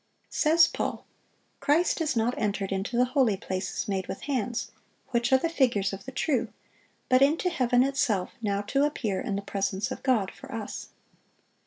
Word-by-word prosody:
Says 325 +2 +5
Paul, - - -3 0.5
"Christ 300 +5 +2
is 310 -4 0
not 230 +2 +1
entered 200 -2 -1
into 195 +5 -2
the 250 - +5
holy 250 -9 +3
places 190 +3 -3
made 190 -2 -2
with - - -6
hands, 245 -4 -2 0.4
which 240 0 0
are 265 - +7
the 300 - 0
figures 235 - +1
of 195 +1 -7
the 265 - -6
true; 270 0 0 0.6
but 255 0 +4
into 315 +6 +3
heaven 250 -5 +3
itself, 250 -9 0
now 200 -2 0
to 275 +7 +1
appear 225 -10 -1
in 230 -7 -2
the 200 - -3
presence 195 0 -2
of - - -5
God 225 -8 +1
for - - -12
us." 220 -2 -5
240 Hz, 175 wpm, -27 LUFS, 200-275 Hz, 0.6 s, are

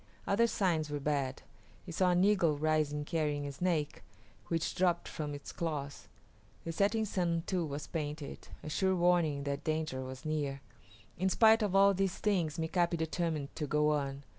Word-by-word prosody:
Other 230 +4 +3
signs 170 -8 0
were 145 0 -2
bad. 140 -2 -1 0.4
He 175 - -7
saw 180 +2 +2
an 180 +1 +3
eagle 190 -7 +3
rising 150 -1 0
carrying 150 -2 -1
a 140 - -4
snake, 155 0 -1 0.5
which 165 -1 -1
dropped 175 -2 +1
from 150 -2 -4
its 145 - -8
claws. 145 -4 -4 0.6
The 165 - -3
setting 205 +6 +1
sun 170 -4 0
too 185 -3 0
was 145 +1 -5
painted, 150 -2 -5 0.2
a 155 - -5
sure 190 +3 +2
warning 170 -5 +2
that 140 0 -3
danger 155 -4 -1
was 130 +3 -8
near. 145 -3 -2 0.6
In 190 +1 +2
spite 220 +3 +5
of 200 -3 0
all 200 0 +6
these 190 -1 0
things 175 -7 0
Mika´pi 170 +1 +1
determined 160 -3 -2
to 150 - -2
go 150 +1 +2
on. 140 -1 -2
160 Hz, 170 wpm, -32 LUFS, 145-180 Hz, 0.6 s, all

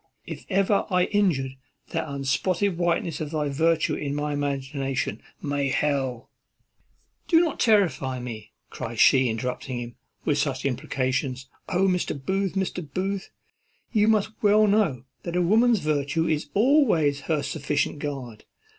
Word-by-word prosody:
If - - -8
ever 195 +1 +2
I 180 -2 +3
injured 160 -11 0 0.3
the 155 - -3
unspotted 170 +8 0
whiteness 170 -2 0
of 155 - -3
thy 150 -2 -1
virtue 160 +3 +2
in 145 -1 -3
my 150 0 -2
imagination, 135 -4 -2 0.2
may 145 -1 0
hell 130 -3 -1 0.5
" - - -42
"Do 330 - +5
not 330 -4 0
terrify 180 - +2
me," 115 -3 -7 0.2
cries 115 -1 -6
she, 130 -2 +6
interrupting 125 +3 -3
him, 120 0 -6 0.3
"with 145 -2 +1
such 135 -2 -1
imprecations. 130 0 -2 0.2
O, 190 +1 +2
Mr. 180 -5 0
Booth! 190 +7 -1
Mr. 190 -2 -2
Booth! 195 +3 -2 0.6
you 215 -2 +3
must 215 -1 +2
well 210 +1 +5
know 200 - +2 0.2
that 170 0 -5
a 180 - +3
woman's 225 +3 +4
virtue 155 +2 0
is 150 -2 -1
always 210 - +3
her 155 -3 +1
sufficient 145 +1 -1
guard. 130 -7 -6
150 Hz, 145 wpm, -25 LUFS, 135-190 Hz, 0.6 s, she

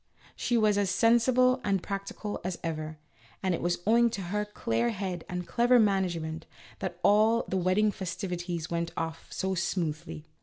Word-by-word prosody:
She 240 - 0
was 210 -2 +3
as 200 -2 +1
sensible 250 +5 +4
and 195 -3 0
practical 200 +1 -5
as 180 -1 -3
ever, 155 -1 -4 0.5
and 185 -1 +1
it - - -2
was 175 0 -1
owing 235 +2 +5
to 215 -3 -4
her 210 0 0
clear 230 +3 -1
head 185 -5 -4
and 180 0 -3
clever 245 +1 +4
management 175 -7 0 0.3
that 175 -2 -4
all 215 +3 +4
the - - -2
wedding 185 +4 +2
festivi 180 -2 -4
ties 170 -1 -3
went 170 0 -1
off 165 0 -4
so 190 0 -2
smoothly. 155 - -3
190 Hz, 165 wpm, -29 LUFS, 175-215 Hz, 0.5 s, owing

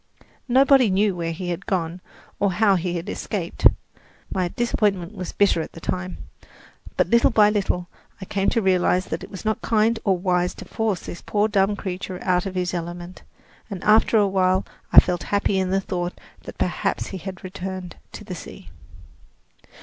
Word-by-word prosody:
Nobody 265 -1 +5
knew 195 +1 +2
where 165 -1 -2
he 175 +2 -5
had 175 +2 -5
gone, 175 -2 -2 0.4
or 200 -2 +2
how 205 +2 +4
he 180 -1 -1
had 170 0 -4
escaped. - - 0 0.7
My 185 -2 0
disappointment 200 -3 0
was 185 -4 -6
bitter 200 -5 +2
at - - -7
the - - -10
time; 185 +2 -3 0.8
but - - +1
little 235 0 +5
by 210 -1 +5
little 190 -4 -1 0.3
I 190 - -7
came 195 +1 0
to 230 - 0
realize 185 -1 +2
that 160 - -5
it - - -9
was 195 +1 -9
not 215 0 0
kind 225 0 +2
or 190 -3 +2
wise 180 -1 0
to - - -9
force 215 -6 -1
this 170 - -8
poor 210 0 +1
dumb 205 -1 +2
creature 185 -2 -5
out 180 0 +1
of 190 - -6
his 180 -1 -1
element, 175 +1 -6 0.5
and 195 -4 -6
after 220 +1 +5
awhile 190 -2 +2 0.3
I - - +11
felt 175 -1 0
happy 200 -1 0
in 185 -1 0
the 195 +1 +2
thought 175 -2 -4 0.3
that - - -9
perhaps - - -1
he 190 - -6
had 190 +2 -8
returned 185 -1 -6 0.2
to - - -8
the 195 -3 -7
sea. 175 - -10
190 Hz, 180 wpm, -23 LUFS, 180-205 Hz, 0.8 s, I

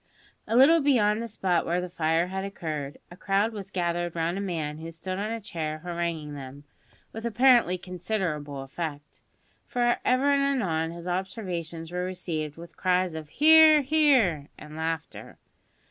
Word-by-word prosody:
A 225 - -1
little 315 +6 +7
beyond 225 -6 +3
the 235 - -4
spot 185 -5 0
where 175 +1 0
the 180 - -3
fire 165 -1 +1
had 190 +1 -4
occurred, 155 -7 -5
a - - -10
crowd 200 +3 0
was 200 -3 -7
gathered 175 -2 -2
round 165 +1 -1
a 195 - -3
man 160 -6 -3
who 165 +1 -7
stood 185 +3 -5
on 210 +2 -2
a 230 - -3
chair 160 -7 -4
haranguing 170 -4 -3
them, 140 0 -9 0.5
with 225 - -7
apparently 235 -5 +4
considerable 175 -6 -4
effect, 145 +1 -6 0.5
for 240 -1 +1
ever 260 +3 +3
and 280 - +2
anon 190 -13 0
his 170 +1 -8
observations 175 -3 -4
were 180 0 -2
received 165 -5 -4
with 170 -1 -12
cries 180 -1 +1
of 155 -2 -7
"Hear, 315 - +7
hear," 260 - +3
and 150 0 -11
laughter. 160 0 -5
180 Hz, 160 wpm, -27 LUFS, 160-215 Hz, 0.5 s, little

